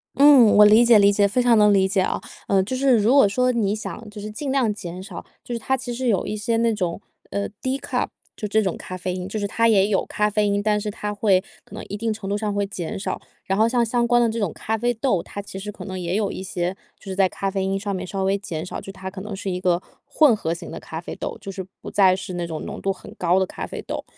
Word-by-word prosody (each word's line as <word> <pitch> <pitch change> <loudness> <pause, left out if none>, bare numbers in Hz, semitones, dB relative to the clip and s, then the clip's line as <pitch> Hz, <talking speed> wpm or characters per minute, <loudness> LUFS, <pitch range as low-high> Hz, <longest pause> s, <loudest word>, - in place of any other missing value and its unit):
嗯， 275 -6 +7
我 210 - +9
理 215 +3 +7
解 235 -2 +7
理 200 -1 +6
解， 200 0 +4
非 225 +5 +1
常 245 -1 +4
能 210 -1 +6
理 190 -1 +4
解 190 0 +1
啊， - - -1 0.3
嗯， 195 -1 +3
就 255 - -3
是 260 -2 +4
如 220 +4 +3
果 275 -8 +6
说 250 +5 +2
你 215 -4 0
想 220 0 -7
就 210 0 -10
是 210 +1 -6
尽 270 +6 -4
量 255 -6 +2
减 180 -3 -7
少， 205 - -8 0.2
就 245 - -6
是 235 - -2
它 265 +3 0
其 245 -1 -5
实 255 +1 -2
有 205 -6 +2
一 215 - -3
些 225 +2 -1
那 230 0 +2
种， 180 -5 -2 0.3
呃， 200 0 -2
decaf 265 +1 -1 0.3
就 210 - -4
这 215 +2 +2
种 190 -4 -1
咖 185 - -7
啡 185 0 -3
因， 180 0 -5
就 215 - -3
是 205 - -1
它 230 +3 +2
也 200 -3 +4
有 200 -2 +1
咖 210 - +1
啡 210 0 +1
因， 200 0 0
但 210 -1 +1
是 210 - -3
它 210 0 -4
会 200 -3 +2 0.2
可 - - -13
能 - - -6
一 205 - -4
定 225 +2 -1
程 215 -2 -5
度 200 - 0
上 210 0 -1
会 205 0 0
减 185 -5 -5
少。 195 - -3 0.2
然 195 - 0
后 220 +2 +4
像 240 -1 +2
相 235 +1 +1
关 240 0 +4
的 235 - +4
这 225 +1 -3
种 200 -6 0
咖 220 - -3
啡 240 +2 +1
豆， 220 -6 +1
它 205 - -9
其 195 -1 -8
实 210 +2 -6
可 - - -10
能 190 -2 -5
也 175 +1 -2
有 205 -1 0
一 - - -6
些 180 -1 -3 0.2
就 - - -22
是 190 -1 -5
在 190 -1 +3
咖 195 +1 -3
啡 195 -1 -1
因 195 +1 -1
上 200 -1 -3
面 185 0 -4
稍 195 +1 -3
微 195 +1 +2
减 175 -5 -5
少， - - -6
就 195 - -8
它 190 -1 -7
可 190 0 -8
能 205 0 -6
是 195 0 -4
一 180 0 -3
个 175 -2 +2 0.3
混 285 -3 +4
合 165 -5 -2
型 170 0 -9
的 165 - -6
咖 160 - -7
啡 175 - -7
豆， - - -5
就 195 - -7
是 190 0 -5 0.2
不 - - -8
再 190 -2 +5
是 190 0 -6
那 175 -1 -3
种 160 -2 -5
浓 - - -7
度 195 - 0
很 190 - -10
高 180 +1 +2
的 190 - +2
咖 - - -6
啡 - - -7
豆。 - - -4
205 Hz, 325 characters per minute, -23 LUFS, 190-225 Hz, 0.3 s, 我